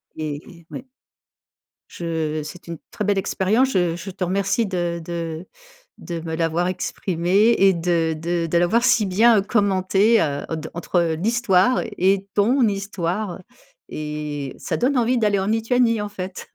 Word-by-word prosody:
et 155 +2 -7
ouais. - - -7 1.0
Je 160 -2 -3
c'est 175 +4 -10
une 170 -1 -6
très - - -4
belle 205 -1 +1
expérience, 210 +7 +1
je 175 -3 +1
je 190 +2 -7
te 185 - -4
remercie 195 +5 0
de 175 -3 -2
de 165 0 -5 0.5
de 170 -2 -6
me 160 0 -5
l'avoir 165 +1 0
exprimée 185 +4 +1
et 195 -1 +5
de 170 -1 0
de 170 +2 -2
de 165 +1 0
l'avoir 200 +8 +2
si 215 -4 +3
bien, 220 +4 +5
heu, - - +1
commentée, 200 +1 +2
heu, 145 -2 -2
en 160 - -2
d 160 0 -6
entre 170 -1 0
l'histoire 225 +1 +2 0.2
et 195 +1 +2
ton 235 +4 +3
histoire 195 -1 -3 0.5
et 150 -2 -5
ça - - -3
donne 255 +1 +1
envie 245 +2 +2
d'aller 210 -3 +2
en 190 - -2
Lituanie, 230 +1 +2
en 210 - -3
fait. 185 -2 -7
185 Hz, 160 wpm, -22 LUFS, 165-210 Hz, 1.0 s, et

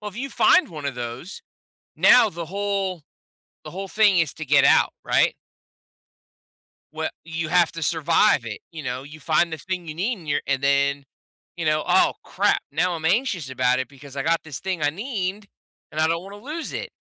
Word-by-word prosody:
Well, 210 - -5
if 205 - -12
you 275 +3 -4
find 370 - +4
one 155 -4 -8
of 140 - -3
those, 120 +10 -7 0.5
now 250 -3 +6
the 170 -2 -6
whole 195 -2 -2 0.6
the - - -9
whole 195 +2 -6
thing 205 -3 +4
is 160 -4 +1
to 160 - -6
get 140 0 +4
out, - - +5
right? - - +2 1.6
We - - -2 0.2
you 160 -1 -4
have 175 0 +3
to 165 - -7
survive 155 -4 +2
it, 110 - -6
you 160 -2 -8
know? 125 -1 -4
You 150 +3 -12
find 160 +2 +1
the 160 - -4
thing 180 +1 -5
you 155 - -5
need 200 +6 -2
and 160 - -13
you're 145 0 +1
and 135 -1 0
then, 140 0 +2 0.5
you 170 - -4
know, 155 0 +2
"Oh, - - +4
crap! - - +1
Now 175 +5 0
I'm 160 -1 -6
anxious 185 - 0
about 130 0 +1
it 130 - -4
because 140 0 -13
I 135 - -1
got 165 +2 +1
this 145 -4 -7
thing 185 -4 -3
I 145 - +3
need, 200 - -4 0.4
and 155 - -3
I 160 - +4
don't 165 +1 -1
wanna 200 +2 -10
lose 300 +8 -6
it." - - -5
165 Hz, 205 wpm, -23 LUFS, 145-190 Hz, 1.6 s, now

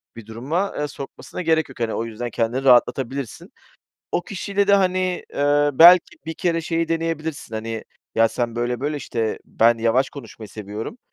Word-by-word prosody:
bir 115 -2 -10
duruma, 140 - -3
eee, 150 - -1
sokmasına 140 +5 -8
gerek 160 -3 +1
yok. 135 - -13
Hani, 115 -2 -1
o 115 - -2
yüzden 115 +2 -5
kendini 120 +3 -1
rahatlatabilirsin. 130 0 +1 0.6
O - - 0
kişiyle 200 +1 -2
de, 200 - +5
hani, 185 -2 +1
eee, 145 +1 +2
belki 170 +3 +7
bir 160 - -4
kere 170 -2 0
şeyi 165 0 -1
deneyebilirsin, 160 -6 -3
hani, 110 0 -4 0.3
"Ya 115 0 +4
sen 120 0 -3
böyle 120 0 -1
böyle, 150 +2 -2
işte, 115 -5 -3
ben 115 +1 +3
yavaş 115 +4 +2
konuşmayı 115 -5 -10
seviyorum, 105 - -7
135 Hz, 165 wpm, -22 LUFS, 115-165 Hz, 0.6 s, belki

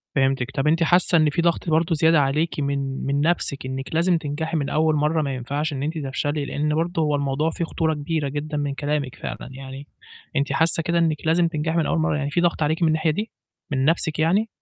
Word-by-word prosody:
فهمتِك. 135 -1 +1
طَب 135 +2 -1
أنتِ 165 +2 +3
حاسّة 175 +1 +4
إن 155 -1 +4
في 160 +4 0
ضغط 170 0 0
برضه 165 +1 +2
زيادة 160 0 +4
عليكِ 150 +4 0
من 140 -1 -2
من 140 +1 0
نَفْسِك 155 -4 0
إنِْك 135 +3 -5
لازم 170 +1 +3
تنجحي 160 +2 -3
من 140 -1 -1
أول 155 +1 +2
مرّة، 150 +2 +1
ما 140 -3 -2
ينفعش 145 +5 -3
إن 135 0 -3
أنتِ 160 +2 -2
تفشلي، 145 +1 -2
لإن 150 +2 -1
برضه 165 +1 0
هو 150 -1 +1
الموضوع 140 +3 0
فيه 170 +1 -3
خطورة 160 0 -1
كبيرة 150 -1 -2
جدًا 150 +2 -4
من 145 -1 -1
كلامِك 145 -1 -2
فعلًا. - - -7
يعني 135 +1 -9 0.5
أنتِ 140 0 0
حاسّة 160 +3 +2
كده 170 +2 0
إنِّك 160 -2 +2
لازم 165 +2 +3
تنجحي 160 0 -2
من 165 - +2
أول 170 - 0
مرّة، 160 -1 +1
يعني 140 -1 -2
فيه 175 - +1
ضغط 170 -2 +1
عليكِ 160 +3 0
من 165 - +4
الناحية 155 0 +2
دي؟ 210 +8 -4 0.4
من 130 -1 +1
نَفْسِك 160 -1 +1
يعني؟ 190 +8 +2
150 Hz, 225 wpm, -23 LUFS, 140-165 Hz, 0.5 s, حاسّة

